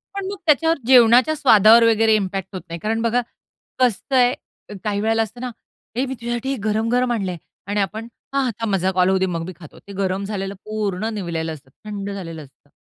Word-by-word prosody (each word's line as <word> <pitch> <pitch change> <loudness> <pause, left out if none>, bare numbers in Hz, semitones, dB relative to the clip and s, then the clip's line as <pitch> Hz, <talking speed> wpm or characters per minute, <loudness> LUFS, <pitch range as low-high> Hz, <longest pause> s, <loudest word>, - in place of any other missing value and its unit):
पण 395 -1 -3
मग - - -4
त्याच्यावर 325 +2 +3
जेवणाच्या 250 +4 +6
स्वादावर 230 -4 +6
वगैरे 225 0 +3
इम्पॅक्ट 195 -2 -2
होत 185 - -5
नाही, 170 - -6
कारण 220 +4 -1
बघा 235 +2 +1 0.6
कसं 255 +2 +1
आहे. 250 0 +5 0.5
काही 205 -1 -1
वेळेला 225 +1 +2
असतं 225 +3 -10
ना, 255 - -3 0.5
"हे 265 - +1
मी 265 - -4
तुझ्यासाठी 240 +2 -3
गरम-गरम 230 +4 +1
आणलंय." 190 -6 -2 0.3
आणि 205 0 0
आपण 215 +4 -4 0.3
"हां, 275 -1 +2
हां. 250 - 0
थांब 225 -2 -2
माझा 190 0 +1
कॉल 185 0 +2
होऊ 190 - +3
दे, 190 - +1
मग 170 -3 -3
मी 185 - -6
खातो." 155 - -13
ते 200 - -12
गरम 190 +1 -1
झालेलं 195 -1 -4
पूर्ण 215 0 -2
निवलेलं 165 -5 -3
असतं, 135 -3 -13 0.2
थंड 200 -1 -5
झालेलं 165 -5 -7
असतं. 140 +1 -22
215 Hz, 200 wpm, -21 LUFS, 190-240 Hz, 0.6 s, जेवणाच्या